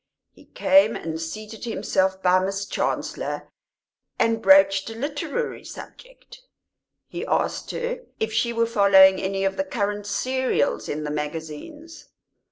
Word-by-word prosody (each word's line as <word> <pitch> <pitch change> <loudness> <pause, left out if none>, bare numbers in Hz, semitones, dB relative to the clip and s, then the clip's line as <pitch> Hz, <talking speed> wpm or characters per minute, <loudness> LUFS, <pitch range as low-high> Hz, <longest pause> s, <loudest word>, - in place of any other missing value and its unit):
He - - -20
came 290 +1 +3
and 160 0 -5
seated 215 +7 -7
himself 190 -4 -1
by 185 0 +5
Miss 195 +1 -2
Chancellor - - -3 0.7
and 225 0 +1
broached 230 -8 +5
a 225 - -8
literary 290 - -4
subject; - - -13 0.7
he - - -6
asked - - -1
her 485 +1 -3 0.2
if 220 0 -2
she 235 +2 +1
were 230 0 +1
following 195 -4 +6
any 195 0 -2
of 195 - -1
the 285 - +1
current 205 -6 -3
"serials" 260 +7 -1
in 150 +1 -3
the 150 - -4
magazines. 160 - -7
210 Hz, 135 wpm, -24 LUFS, 190-270 Hz, 0.7 s, following